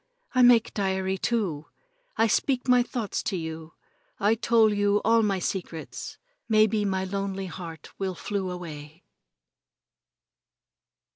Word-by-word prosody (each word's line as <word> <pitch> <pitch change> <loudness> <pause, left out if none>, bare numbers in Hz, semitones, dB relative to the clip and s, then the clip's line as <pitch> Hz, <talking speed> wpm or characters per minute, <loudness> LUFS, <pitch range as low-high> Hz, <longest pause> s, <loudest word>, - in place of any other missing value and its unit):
I 255 - +4
make 245 -2 +5
diary, 190 -1 -1
too. 185 -12 -1 0.5
I 225 - +4
speak 250 +4 +1
my 250 -1 +5
thoughts 240 -3 -3
to 190 - -2
you. 160 -1 -7 0.4
I 205 +2 +3
tole 225 -1 +3
you 205 0 +2
all 225 +1 +5
my 200 -3 +1
secrets. 175 -3 -5 0.3
Maybe 215 -1 +4
my 190 -1 0
lonely 195 0 -3
heart 170 -4 -8
will 190 -2 -2
flew 195 +1 -3
away." 160 -2 -8
195 Hz, 125 wpm, -26 LUFS, 180-220 Hz, 0.5 s, make